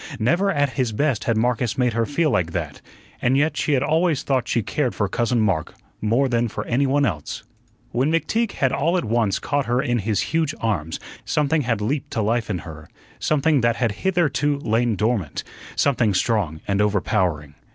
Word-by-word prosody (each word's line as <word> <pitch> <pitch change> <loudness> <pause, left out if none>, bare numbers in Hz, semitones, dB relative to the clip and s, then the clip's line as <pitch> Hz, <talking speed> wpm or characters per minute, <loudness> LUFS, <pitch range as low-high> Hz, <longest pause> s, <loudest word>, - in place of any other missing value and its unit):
Never 170 - +2
at 145 -6 +1
his 130 -4 -1
best 140 -1 0
had 115 -2 +1
Marcus 120 -1 0
made 125 -2 +2
her 115 0 0
feel 155 +1 +1
like 85 -2 0
that, - - -4 0.4
and 130 +2 +3
yet 150 +3 +2
she 150 - 0
had 135 -1 +2
always 160 0 +1
thought 130 -3 0
she 115 - 0
cared 125 -5 -1
for 100 - 0
Cousin 120 +4 0
Mark 100 -8 0 0.3
more 115 +6 +2
than 120 -1 +1
for 105 - -5
any 135 +3 +1
one 140 +1 +2
else. 75 - -3 0.5
When 135 +5 +1
McTeague 200 +8 0
had 135 -2 +1
all 165 +7 +1
at 175 - -1
once 110 -3 +1
caught 145 -1 -1
her 120 +1 +1
in 120 -2 0
his 105 -1 0
huge 160 -2 +1
arms, 85 -8 -2 0.2
something 150 +1 +1
had 115 -5 -1
leaped 130 +6 -2
to 115 - 0
life 115 0 0
in 95 - -1
her 80 -2 -10 0.3
something 150 -1 +2
that 115 0 +2
had 115 -1 0
hitherto 165 -6 +1
lain 115 -3 +1
dormant, 105 -7 -1 0.3
something 120 -8 +2
strong 90 -7 0
and 100 +1 +1
overpowering. 90 -7 0
120 Hz, 195 wpm, -22 LUFS, 105-145 Hz, 0.5 s, and